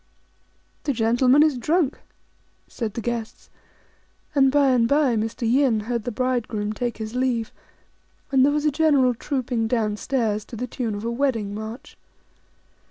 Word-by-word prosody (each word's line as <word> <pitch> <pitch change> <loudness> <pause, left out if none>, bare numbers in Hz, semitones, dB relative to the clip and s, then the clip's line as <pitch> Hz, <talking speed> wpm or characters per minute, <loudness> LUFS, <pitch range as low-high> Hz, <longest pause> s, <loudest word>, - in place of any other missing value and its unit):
"The 285 - +1
gentleman 250 +5 +4
is 300 -5 +1
drunk," 305 +2 +1 0.7
said 220 -4 -5
the 235 - -3
guests; 235 -2 -5 0.8
and 270 -2 +4
by 280 -1 +4
and 240 -2 +3
by 280 -2 +3
Mr. 225 +2 -2
Yin 245 -2 +3
heard 235 0 -3
the 245 - -2
bridegroom 225 -3 -1
take 240 0 -3
his 220 0 -6
leave, 250 -3 -1 0.8
and 265 -1 +4
there 285 - +4
was 300 +1 -1
a 300 - +3
general 280 -4 +3
trooping 245 -2 -2
down 220 -3 0
stairs 220 -5 -1
to 235 - -10
the 245 +3 -3
tune 230 -3 -3
of 205 +2 -6
a 235 - -1
wedding 235 -5 -1
march. 220 +4 -8
245 Hz, 160 wpm, -23 LUFS, 225-270 Hz, 0.8 s, gentleman